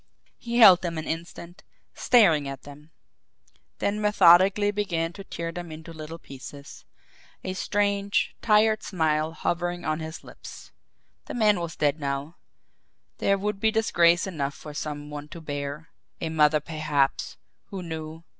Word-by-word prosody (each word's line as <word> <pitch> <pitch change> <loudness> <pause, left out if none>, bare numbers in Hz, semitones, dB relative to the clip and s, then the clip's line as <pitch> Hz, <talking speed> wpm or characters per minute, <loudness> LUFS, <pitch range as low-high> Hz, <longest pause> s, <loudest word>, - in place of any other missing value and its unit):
He 235 0 -3
held 190 -7 +9
them 170 -2 -3
an 155 - -4
instant, 170 +1 -7 0.3
staring 170 - +4
at 135 -1 -7
them, 145 +2 -13 0.9
then 210 +1 -1
methodically 200 0 +5
began 175 -5 -2
to 195 - -9
tear 170 -3 -5
them 175 -1 -7
into 160 +1 -9
little 160 +1 -8
pieces, 140 -1 -11 0.6
a 185 - -3
strange, 200 +1 0
tired 215 0 +3
smile 155 -3 0
hovering 175 +2 -2
on 155 0 -1
his 160 +1 -7
lips. - - -12 0.5
The - - -7
man 210 -5 +3
was 170 -2 -5
dead 150 +1 +1
now 140 +3 -4 0.8
there 200 - +2
would 205 0 -3
be 220 - +3
disgrace 175 -6 +3
enough 145 -7 -3
for 150 - -10
some 150 -1 -5
one 145 0 -7
to 170 - -10
bear, 145 0 -5 0.3
a 160 - -3
mother 150 -1 +3
perhaps 150 -3 -1 0.3
who 190 -2 -7
knew! 160 -1 -7
165 Hz, 145 wpm, -26 LUFS, 150-195 Hz, 0.9 s, held